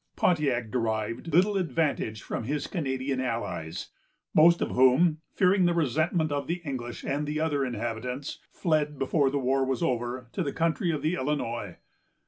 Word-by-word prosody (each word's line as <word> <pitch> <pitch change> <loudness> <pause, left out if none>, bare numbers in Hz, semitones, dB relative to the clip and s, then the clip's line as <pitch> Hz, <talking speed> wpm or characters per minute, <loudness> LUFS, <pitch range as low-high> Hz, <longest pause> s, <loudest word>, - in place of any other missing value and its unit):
Pontiac 135 -10 +1
derived 115 +5 -2
little 195 +6 +4
advantage 145 - -1
from 115 - -4
his 145 +3 -2
Canadian 135 -5 -2
allies, 100 -9 -3 0.4
most 170 +2 +6
of - - -1
whom, 140 +6 +4 0.2
fearing 185 0 +4
the 175 -1 +2
resentment 155 +1 +1
of 145 -1 -2
the 175 +2 -1
English 120 -4 -5
and 145 +2 -1
the 150 +1 -2
other 150 -3 +1
inhabitants, 125 +3 -4
fled, 150 -4 0
before 135 +1 +2
the 140 - -1
war 135 0 +1
was 135 +5 -1
over, 125 -2 -1
to - - -2
the 145 -5 -1
country 165 +1 0
of 155 -3 -1
the 155 - +1
Illinois. 120 - -2
140 Hz, 160 wpm, -28 LUFS, 125-160 Hz, 0.4 s, most